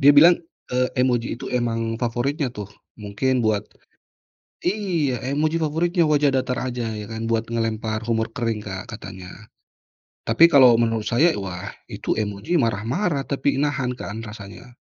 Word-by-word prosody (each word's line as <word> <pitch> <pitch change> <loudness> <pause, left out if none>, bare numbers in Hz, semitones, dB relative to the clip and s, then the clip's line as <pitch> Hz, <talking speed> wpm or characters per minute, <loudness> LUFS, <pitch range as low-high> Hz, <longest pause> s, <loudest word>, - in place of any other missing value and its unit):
Dia 145 +1 +8
bilang, 170 +4 +8 0.3
eee, 125 0 +2
emoji 120 -2 0
itu - - -8
emang 115 -2 -1
favoritnya 130 +5 0
tuh. 105 -4 -7 0.3
Mungkin 115 +5 -1
buat 110 -2 +1 1.0
iya, 175 -9 0 0.2
emoji 155 +2 +1
favoritnya 170 +3 +1
wajah 145 -1 +3
datar 125 -1 0
aja, 120 -2 -3
ya 105 -1 -6
kan. 115 0 -4
Buat 115 0 0
melempar 110 -1 -1
humor 115 -1 0
kering 115 -4 -1
Kak, 95 -2 -6
katanya. 95 -4 -9 1.0
Tapi 115 +9 +7
kalau 130 -5 +8
menurut 115 -2 0
saya, 160 +9 +4
wah 95 0 -6 0.2
itu - - -2
emoji 105 - -3
marah-marah, 130 - 0
tapi 140 0 0
nahan 140 -3 0
kan, 110 +3 -6
rasanya. 110 +3 -10
120 Hz, 145 wpm, -23 LUFS, 110-140 Hz, 1.0 s, Dia